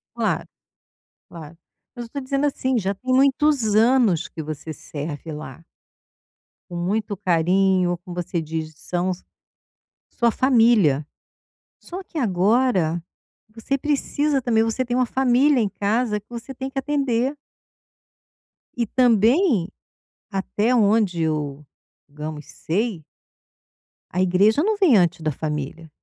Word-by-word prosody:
Claro, - - -1 0.8
claro, 165 -1 -11 0.4
mas 240 - -5
eu - - -9
estou 280 +5 -6
dizendo 275 +1 -1
assim, 260 -2 0
já 195 -1 -1
tem 255 +6 -2
muitos 270 -4 +3
anos 220 - +3
que 160 - -7
você 155 +1 -6
serve 150 +2 -7
lá. 150 +1 -9 1.1
Com 175 - -7
muito 205 +4 -1
carinho, 185 0 +2
como 180 -1 -8
você 175 -1 -2
diz 160 0 -5
são 175 +4 -2
a - - 0 1.0
sua 235 -1 +3
família, 225 - +3 0.8
só 370 +2 -8
que 340 - -10
agora 195 - +2 0.5
você 255 +4 -2
precisa 290 0 0
também, 225 -3 +2
você 225 +3 -1
tem 245 0 -2
uma 255 - +3
família 260 +2 +3
em 210 - 0
casa 210 +2 0
que 205 - -28
você 240 +3 -7
tem 265 +1 -5
que 270 - -11
atender. 270 -1 0 1.4
E 240 - 0
também 235 - +3 0.6
até 205 +5 0
onde 205 -6 +2
eu, 150 -2 -2 0.4
digamos, 150 +1 -7
sei 170 - -3 1.1
a 180 - -3
igreja 200 - +3
não 435 +1 +1
vem 350 - +5
antes 175 -2 +2
da 155 -1 0
família. 150 +2 -5
210 Hz, 130 wpm, -22 LUFS, 170-255 Hz, 1.4 s, vem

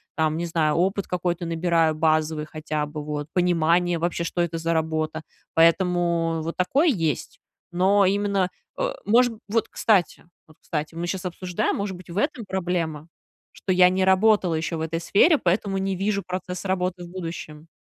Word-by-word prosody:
там, 155 -1 +1
не 170 - -2
знаю, 160 -3 +1
опыт 190 +3 0
какой-то 175 -1 -2
набираю 165 -1 +1
базовый 155 -1 +1
хотя 155 -1 -3
бы, 150 0 -7
вот, 150 0 -4
понимание 175 0 +2
вообще, 170 +1 -1
что 170 - -4
это 170 -1 -2
за 165 +1 0
работа. 160 0 -1 0.3
Поэтому 170 -1 +2
вот 165 +1 -4
такое 265 - +2
есть. 165 - -2 0.3
Но 190 +3 +3
именно, 200 -1 +1 0.3
э, - - -1
может 240 +3 +4 0.2
Вот 225 +2 +1
кстати, 195 -8 +1 0.2
вот 155 -2 -21
кстати, 155 0 -4
мы 170 +1 -4
сейчас 185 +1 -4
обсуждаем, 180 0 -2
может 200 -2 -3
быть, 180 -1 -13
в 175 - -6
этом 255 -3 -1
проблема, 170 -5 -2 0.5
что 190 - -2
я 180 0 +6
не 185 +1 +1
работала 190 -1 +4
еще 160 +1 -2
в 160 - -4
этой 160 +1 -2
сфере, 250 - +4
поэтому 195 -1 0
не 195 0 -1
вижу 200 +1 -1
процесс 180 0 -5
работы 180 -1 -1
в - - -12
будущем. 165 -3 -7
175 Hz, 170 wpm, -24 LUFS, 160-190 Hz, 0.5 s, я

